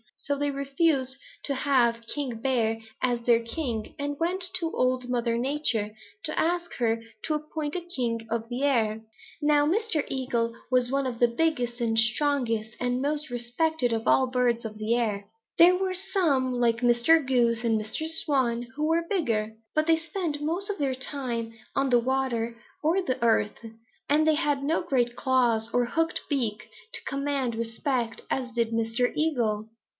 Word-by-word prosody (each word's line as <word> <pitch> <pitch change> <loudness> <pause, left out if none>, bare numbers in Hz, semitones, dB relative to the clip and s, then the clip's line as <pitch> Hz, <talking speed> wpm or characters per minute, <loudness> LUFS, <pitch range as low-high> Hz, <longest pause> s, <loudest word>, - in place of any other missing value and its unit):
So 285 - -2
they 290 +1 0
refused 275 -1 0 0.3
to 280 - 0
have 255 -4 +3
old 230 0 -21
King 255 -6 -4
Bear 230 -4 +1 0.2
as 245 -2 +1
their 235 -1 +4
king 230 -2 -4
and 285 0 -3
went 360 +3 0
to 335 -3 0
Old 255 0 +1
Mother 235 -1 0
Nature 240 -5 0 0.3
to 310 -1 -1
ask 345 +1 0
her 230 -2 0 0.2
to 310 - 0
appoint 305 0 -4
a 360 - -1
king 240 -10 -3
of 230 0 -2
the 245 +3 -3
air. 225 -6 +2 0.4
Now 295 0 +4
Mr. 385 -3 +1
Eagle 240 -3 -1 0.2
was 250 -1 +3
one 275 0 +1
of 245 -3 -3
the 240 - +6
biggest 245 -2 0
and 225 -1 +2
strongest 230 -2 +1
and 245 +1 0
most 295 +1 -1
respected 245 +2 0
of 225 +1 -2
all 265 - +5
the - - -10
birds 245 -2 +1
of 215 -1 -6
the 215 +2 +1
air. 210 -4 -1 0.3
There 350 +2 +8
were 375 0 -1
some, 350 -10 +1
like 235 -2 +2
Mr. 245 +7 +4
Goose 240 -3 +2
and 225 -2 +2
Mr. 220 +9 -3
Swan, 265 -7 +1
who 300 +1 -1
were 330 +1 +2
bigger, 225 - 0 0.2
but 310 0 +3
they 325 0 +4
spent 330 -2 -3
most 345 +7 -1
of 410 - -2
their 270 -3 0
time 250 -4 -3 0.2
on 275 0 +2
the 245 -1 +5
water 240 -2 -1 0.3
or 335 +5 +3
the 260 -8 -2
earth, 220 -2 +2 0.5
and 300 +2 +4
they 315 -1 +4
had 290 -3 0
no 315 +4 +1
great 245 -6 0
claws 235 -4 +2
or 245 0 +3
hooked 325 +7 0
beak 230 -8 -1 0.2
to - - -4
command 275 -3 -1
respect 230 +1 -2
as 255 -2 -1
did 235 -1 +1
Mr. 230 +2 +1
Eagle. 230 -9 0
255 Hz, 175 wpm, -27 LUFS, 235-300 Hz, 0.5 s, There